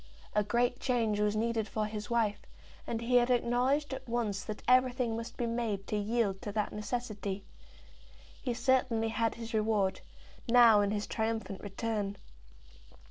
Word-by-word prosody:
A 210 Hz, -, +3 dB
great 240 Hz, +4 st, +1 dB
change 225 Hz, -5 st, +1 dB
was 210 Hz, 0 st, +1 dB
needed 225 Hz, 0 st, 0 dB
for 215 Hz, -1 st, -1 dB
his 210 Hz, -1 st, -5 dB
wife, 225 Hz, -3 st, +1 dB, 0.5 s
and 230 Hz, -1 st, -2 dB
he 245 Hz, +1 st, +3 dB
had 240 Hz, 0 st, +3 dB
acknowledged 250 Hz, +4 st, +2 dB
at 265 Hz, -2 st, -7 dB
once 220 Hz, -5 st, -1 dB
that 215 Hz, -, -6 dB
everything 250 Hz, -2 st, +3 dB
must 230 Hz, +1 st, -6 dB
be 240 Hz, -, -1 dB
made 230 Hz, -4 st, -2 dB
to -, -, -3 dB
yield 210 Hz, -2 st, 0 dB
to 205 Hz, -, -4 dB
that 210 Hz, -1 st, -1 dB
necessity. 210 Hz, -3 st, -4 dB, 1.0 s
He 245 Hz, -, -2 dB
certainly 250 Hz, -2 st, +2 dB
had 225 Hz, +1 st, 0 dB
his 230 Hz, 0 st, -7 dB
reward, 215 Hz, -3 st, +1 dB, 0.5 s
now 230 Hz, -3 st, +7 dB
in 200 Hz, -, +1 dB
his 210 Hz, 0 st, -1 dB
triumphant 220 Hz, -3 st, -2 dB
return. 205 Hz, 0 st, -3 dB
225 Hz, 155 wpm, -31 LUFS, 210-240 Hz, 1.0 s, now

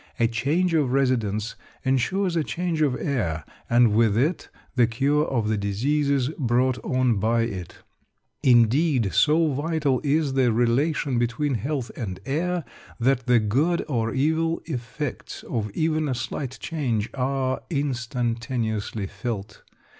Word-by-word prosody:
A 115 Hz, -, +4 dB
change 145 Hz, +11 st, 0 dB
of 145 Hz, -6 st, +2 dB
residence 115 Hz, -6 st, 0 dB, 0.3 s
ensures 170 Hz, +8 st, +1 dB
a 165 Hz, -, +2 dB
change 170 Hz, 0 st, -2 dB
of 140 Hz, -4 st, +2 dB
air, 95 Hz, -, -2 dB, 0.2 s
and 120 Hz, -2 st, +5 dB
with 110 Hz, -1 st, +3 dB
it 150 Hz, +8 st, 0 dB, 0.3 s
the 120 Hz, -3 st, +4 dB
cure 140 Hz, +6 st, +1 dB
of 115 Hz, -5 st, 0 dB
the 110 Hz, 0 st, +1 dB
diseases 135 Hz, +6 st, +1 dB
brought 125 Hz, 0 st, +1 dB
on 130 Hz, -3 st, +1 dB
by 115 Hz, +3 st, +2 dB
it. 95 Hz, -7 st, -5 dB, 0.7 s
Indeed, 125 Hz, -, +3 dB
so 155 Hz, 0 st, +3 dB
vital 145 Hz, -2 st, 0 dB
is 145 Hz, -1 st, +1 dB
the 130 Hz, -3 st, +3 dB
relation 125 Hz, +3 st, +1 dB
between 120 Hz, +5 st, 0 dB
health 130 Hz, +2 st, -2 dB
and 95 Hz, -6 st, -5 dB
air 175 Hz, +4 st, -1 dB, 0.4 s
that 125 Hz, 0 st, +1 dB
the 125 Hz, -1 st, +5 dB
good 135 Hz, +11 st, +1 dB
or 115 Hz, -6 st, -1 dB
evil 160 Hz, +5 st, 0 dB
effects 130 Hz, 0 st, -5 dB
of 110 Hz, -3 st, -3 dB
even 155 Hz, -1 st, +1 dB
a 130 Hz, -, 0 dB
slight 130 Hz, +3 st, -4 dB
change 120 Hz, -10 st, -2 dB
are 130 Hz, 0 st, -1 dB
instantaneously 120 Hz, -, -2 dB
felt. 105 Hz, +1 st, -5 dB
130 Hz, 135 wpm, -24 LUFS, 115-150 Hz, 0.7 s, and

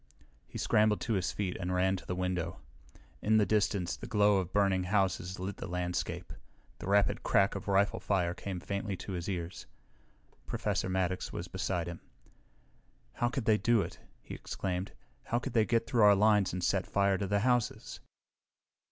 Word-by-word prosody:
He -, -, -8 dB
scrambled 105 Hz, -1 st, +3 dB
to 115 Hz, -, -1 dB
his 90 Hz, -4 st, 0 dB
feet 95 Hz, -3 st, -3 dB
and 90 Hz, 0 st, -2 dB
ran 95 Hz, +1 st, +2 dB
to 95 Hz, -, -9 dB
the 90 Hz, -, -2 dB
window. 90 Hz, -1 st, -2 dB, 0.6 s
In 110 Hz, +1 st, +3 dB
the 105 Hz, -, +4 dB
distance 100 Hz, -4 st, +1 dB
the -, -, -9 dB
glow 105 Hz, -1 st, +4 dB
of 95 Hz, -2 st, -2 dB
burning 100 Hz, -2 st, +2 dB
houses 95 Hz, -1 st, 0 dB
lit 95 Hz, +2 st, -5 dB
the -, -, -6 dB
landscape. 90 Hz, 0 st, -3 dB, 0.5 s
The -, -, -7 dB
rapid 100 Hz, -2 st, +3 dB
crack 100 Hz, 0 st, +3 dB
of 100 Hz, +1 st, -6 dB
rifle 100 Hz, 0 st, +2 dB
fire 90 Hz, -4 st, 0 dB
came 95 Hz, 0 st, -5 dB
faintly 100 Hz, +1 st, -3 dB
to 100 Hz, -, -7 dB
his 90 Hz, 0 st, -4 dB
ears. 85 Hz, -2 st, -5 dB, 0.8 s
Professor -, -, -1 dB
Maddox 95 Hz, 0 st, -1 dB
was -, -, -5 dB
beside 90 Hz, -3 st, -2 dB
him. 85 Hz, -1 st, -7 dB, 1.1 s
"How 120 Hz, -, 0 dB
could 130 Hz, -2 st, -3 dB
they 110 Hz, -1 st, +4 dB
do 115 Hz, -3 st, +3 dB
it?" -, -, -8 dB, 0.3 s
Ken -, -, -7 dB
exclaimed. 90 Hz, +1 st, -4 dB, 0.3 s
"How 120 Hz, -, 0 dB
could 120 Hz, -, -4 dB
they 110 Hz, -2 st, +4 dB
get 115 Hz, 0 st, +1 dB
through 120 Hz, -1 st, +1 dB
our 105 Hz, -1 st, +8 dB
lines 105 Hz, -2 st, +4 dB
and 90 Hz, 0 st, -4 dB
set 95 Hz, 0 st, +1 dB
fire 100 Hz, -1 st, +2 dB
to 100 Hz, -, -1 dB
the 100 Hz, +1 st, +1 dB
houses?" 125 Hz, -1 st, 0 dB
95 Hz, 180 wpm, -31 LUFS, 90-105 Hz, 1.1 s, our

